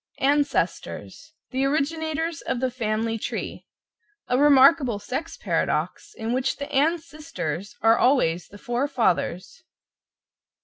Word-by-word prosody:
=ANCESTORS= 285 +1 -1 0.2
The 260 0 0
originators 315 +2 -1
of 250 - -2
the 260 0 0
Family 225 -1 -1
Tree, - - -5 0.6
a 250 - +1
remarkable 275 -3 +5
sex 255 +10 -5
paradox - - -2
in 225 +1 -2
which 260 +1 0
the 280 - -5
Ann 295 +5 +3
sisters 295 - -6
are 225 +1 +5
always 180 - +2
the 205 - -13
four 245 +6 -1
fathers. 230 - -1
265 Hz, 120 wpm, -24 LUFS, 225-295 Hz, 0.6 s, remarkable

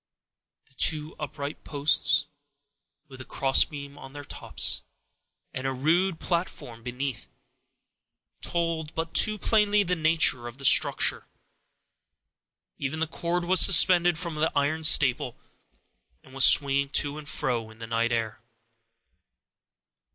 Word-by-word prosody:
The - - -28
two 155 +3 +1
upright 145 0 -7
posts, 145 -1 +1 0.8
with 130 -2 -13
a - - -8
crossbeam 140 +2 -1
on 135 0 -13
their 145 0 -9
tops, - - -2 0.7
and 130 +1 -5
a - - -2
rude 165 +6 0
platform 170 -9 -5
beneath, 125 +1 -6 1.1
told 165 -2 -3
but 165 0 -5
too 215 -1 +4
plainly 210 0 +2
the 180 -1 -1
nature 155 -7 +1
of 120 +1 -10
the 140 - -6
structure; - - +2 1.5
even 140 +3 -4
the 160 - 0
cord 170 +2 -4
was 185 +1 +4
suspended 175 -2 +5
from 170 -3 -5
an 160 - +1
iron 155 +3 -1
staple, 130 -5 +3 0.9
and 130 - -19
was 135 0 +4
swinging 140 -1 +3
to 145 +1 -1
and 145 -2 -10
fro, 125 -7 -3
in 110 - -17
the 115 - -9
night 115 +1 -2
air. 115 -1 -4
145 Hz, 130 wpm, -25 LUFS, 135-165 Hz, 1.5 s, suspended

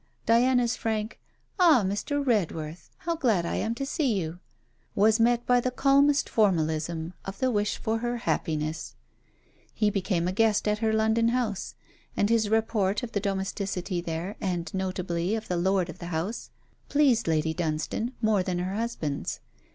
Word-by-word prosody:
Diana's 245 +1 +3
frank: 220 0 -3 0.4
'Ah, 320 - +6
Mr. 280 +9 -1
Redworth, 165 - -1 0.2
how 335 -1 0
glad 225 - +1
I - - -2
am 225 +1 -1
to 275 - -3
see 270 - 0
you!' 165 0 -5 0.6
was 215 +3 +4
met 240 +1 +3
by 245 0 +4
the 255 - 0
calmest 280 +2 +3
formalism 165 -4 0
of 195 0 -7
the 255 +3 +1
wish 210 -1 0
for 225 +1 -1
her 240 +1 -2
happiness. 155 -8 -2 0.8
He 210 -2 +1
became 185 -3 0
a - - 0
guest 215 +1 +2
at 210 0 +1
her 220 -1 +1
London 220 +1 +2
house, 230 -5 -1 0.4
and 205 +2 +2
his 220 -2 +2
report 220 -2 +1
of 235 - -5
the 205 - 0
domesticity 190 -2 -2
there, 170 +4 -4
and 180 -4 -2
notably 185 0 -1
of 220 0 -5
the 180 - -1
lord 190 0 +1
of 170 - -9
the 170 - -6
house, 175 +7 -3 0.4
pleased 275 - +3
Lady 160 0 +1
Dunstane 160 +9 -2
more 215 -3 +3
than 180 -1 -2
her 180 +2 -2
husband's. 200 -10 -3
205 Hz, 165 wpm, -27 LUFS, 175-230 Hz, 0.8 s, Ah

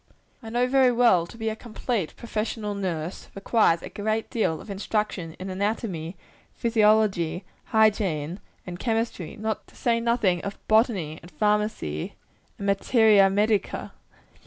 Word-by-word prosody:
I 225 - -8
know, 240 +2 +1
very 260 0 +4
well, 235 -8 +4
that - - -13
to - - -13
be 225 -1 -1
a 220 - -3
complete 225 -5 -3
professional 215 -2 -3
nurse, 180 -4 -4
requires 195 -4 +2
a - - -6
good 215 +2 -2
deal 165 -9 0
of 210 - -9
instruction 195 -4 -2
in 190 +1 -6
anatomy, 190 -4 -3 0.4
physiology, 210 -6 +2 0.2
hygiene 200 -7 +1 0.3
and 175 -1 -7
chemistry 225 -7 -2
to 220 +1 -2 0.2
say 235 -1 +1
nothing 230 -7 +1
of 200 0 -5
botany, 210 - +2
and 175 - -13
pharmacy, 210 - -1 0.4
and 200 - -6
materia 200 0 +5
medica. 210 +1 0
210 Hz, 135 wpm, -25 LUFS, 180-225 Hz, 0.4 s, materia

